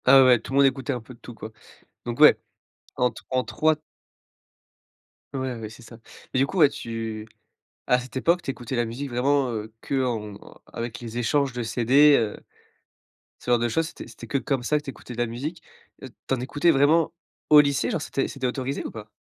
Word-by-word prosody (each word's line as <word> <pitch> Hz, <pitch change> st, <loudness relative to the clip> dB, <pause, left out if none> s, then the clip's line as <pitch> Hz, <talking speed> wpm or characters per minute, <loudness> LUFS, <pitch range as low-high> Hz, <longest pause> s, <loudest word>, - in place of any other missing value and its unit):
Ah 135 Hz, +1 st, +8 dB
ouais, 125 Hz, -2 st, +6 dB
tout 130 Hz, -, -9 dB
le -, -, +1 dB
monde 140 Hz, -, +6 dB
écoutait 135 Hz, +1 st, 0 dB
un 125 Hz, -, -4 dB
peu 120 Hz, +3 st, -13 dB
de 120 Hz, -, -19 dB
tout, 120 Hz, -, -11 dB
quoi. 110 Hz, 0 st, -8 dB, 0.5 s
Donc 120 Hz, +1 st, -4 dB
ouais, 150 Hz, -, +8 dB, 0.6 s
en 125 Hz, 0 st, +3 dB
t 115 Hz, -, -12 dB
en 130 Hz, 0 st, +1 dB
3. 155 Hz, +3 st, +1 dB, 1.6 s
Ouais, 130 Hz, -2 st, -3 dB
ouais, 110 Hz, -2 st, -7 dB
c'est 110 Hz, -, -14 dB
ça. 115 Hz, -1 st, -13 dB, 0.4 s
Et 130 Hz, -, +2 dB
du 135 Hz, -, +4 dB
coup, 190 Hz, -, -6 dB
ouais, 155 Hz, -4 st, +7 dB
tu 115 Hz, -3 st, -5 dB, 0.6 s
à 125 Hz, -, +4 dB
cette 125 Hz, +1 st, -7 dB
époque, 170 Hz, +6 st, +2 dB
tu 135 Hz, -, -2 dB
écoutais 125 Hz, 0 st, -6 dB
la 120 Hz, -, +2 dB
musique 125 Hz, +5 st, -5 dB
vraiment, 135 Hz, +2 st, +2 dB
heu, 110 Hz, -1 st, -5 dB
que 135 Hz, -1 st, -1 dB
en 105 Hz, -4 st, -3 dB, 0.4 s
avec 115 Hz, 0 st, -5 dB
les 115 Hz, 0 st, -7 dB
échanges 140 Hz, +2 st, +1 dB
de 120 Hz, -1 st, -3 dB
CD, 130 Hz, +6 st, +5 dB
heu, 110 Hz, -3 st, -1 dB, 1.0 s
ce -, -, -5 dB
genre 120 Hz, -, +5 dB
de 120 Hz, -, +1 dB
choses? 165 Hz, +7 st, 0 dB
C'était -, -, -10 dB
c'était -, -, -11 dB
que -, -, 0 dB
comme 135 Hz, -1 st, -1 dB
ça 150 Hz, +4 st, +2 dB
que 145 Hz, -, -13 dB
tu -, -, -5 dB
écoutais 125 Hz, 0 st, -11 dB
de -, -, -12 dB
la 120 Hz, -, +2 dB
musique? 145 Hz, +9 st, -5 dB, 0.4 s
Heu, 135 Hz, -, -7 dB, 0.2 s
tu -, -, +2 dB
en 125 Hz, -, -4 dB
écoutais 145 Hz, +6 st, +2 dB
vraiment 150 Hz, +3 st, +3 dB, 0.4 s
au 150 Hz, -1 st, +10 dB
lycée, 140 Hz, -1 st, +1 dB
genre? 155 Hz, -, -2 dB
C'était 135 Hz, -, -2 dB
c'était 135 Hz, -2 st, -3 dB
autorisé 130 Hz, +2 st, -3 dB
ou -, -, -5 dB
pas? 110 Hz, -1 st, -9 dB
130 Hz, 220 wpm, -25 LUFS, 120-140 Hz, 1.6 s, au